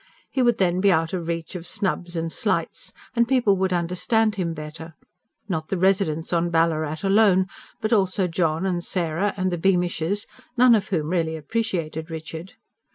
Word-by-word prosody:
He 265 - 0
would 240 -2 +3
then 180 -1 +1
be 200 0 +5
out 165 0 +1
of 175 -3 -3
reach 165 -1 -3
of 175 -2 -7
snubs 180 -3 -2
and 165 0 -2
slights, - - -2 0.2
and 235 0 +3
people 245 -6 +3
would 190 0 0
understand 185 +6 +1
him 175 -5 -2
better 155 +1 -8 0.5
not 160 -5 -2
the 190 - -2
residents 180 -4 +1
on 170 0 +2
Ballarat 160 -1 0
alone, 195 -2 +4 0.4
but 220 +1 +1
also 190 -2 +2
John, 165 0 0
and 175 -2 -1
Sarah, 175 +3 -1
and 185 -1 0
the 175 - -2
Beamishes, 180 +1 +1 0.3
none 250 0 +7
of 210 -4 +2
whom 160 -5 -1
really 165 -2 0
appreciated 160 -3 -3
Richard. 160 +2 -7
180 Hz, 170 wpm, -24 LUFS, 165-195 Hz, 0.5 s, none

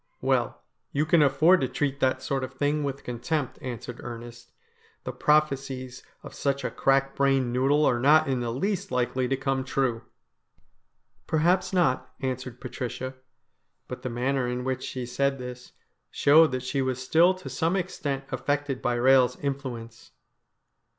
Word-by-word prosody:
' - - -43
Well, - - 0 0.3
you 145 +2 +1
can 160 +1 +4
afford 155 +6 +5
to 130 - +1
treat 140 +2 -2
that 130 0 +1
sort 135 0 -1
of 130 +1 -6
thing 145 +2 0
with 140 -1 -4
con 120 -1 -5
tempt,' 150 +1 -2
answered 125 -1 -6
Ernest. 120 0 -9 0.5
'The - - -4
prophecies 135 -4 0 0.2
of - - -10
such 140 -1 -1
a - - -2
crack 135 0 +1
brained 135 -3 +2
noodle 140 +4 +3
are 120 - +2
not 155 +4 +5
in 130 -2 0
the 120 -1 -2
least 195 - -2
likely 125 0 0
to 135 +1 0
come 135 -1 -1
true.' 130 -3 -1 0.7
' - - -45
Perhaps 180 +4 +2
not,' 170 -9 +1
answered 130 -2 -4
Patricia; 130 0 -5 0.7
but 125 0 -7
the 130 - -4
manner 125 +2 -1
in 125 0 -3
which 130 0 -2
she 125 -1 -4
said 140 +3 0
this 125 -1 -9 0.4
showed 155 +1 +5
that 130 -1 -3
she 135 +1 -1
was 130 -1 -1
still 165 +8 +4
to 185 - -11
some 165 +3 0
extent 145 -7 -3
affected 140 +1 -2
by 120 - 0
Eehel's 130 0 +4
influence. 125 -5 -5
135 Hz, 165 wpm, -26 LUFS, 125-145 Hz, 0.7 s, afford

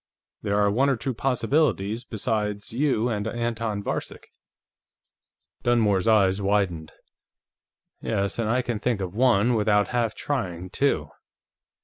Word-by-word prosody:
There 100 -1 0
are 100 -1 +3
one 135 +7 +2
or 135 - +2
two 130 +3 -3
possibilities 120 - 0
besides 105 -2 -3
you 125 -3 +1
and 105 -3 -2
Anton 115 -3 -2
Varcek." - - -5 1.3
Dunmore's 110 -5 +2
eyes 100 -3 +4
widened. 95 -5 0 1.1
"Yes, 100 0 -2
and 110 -2 0
I 125 +2 +1
can 120 -3 -3
think 120 -2 0
of 95 -2 -4
one, 120 0 +3
without 105 -2 +2
half 120 -3 0
trying, 95 -10 -3
too!" 80 - 0
110 Hz, 125 wpm, -25 LUFS, 100-120 Hz, 1.3 s, eyes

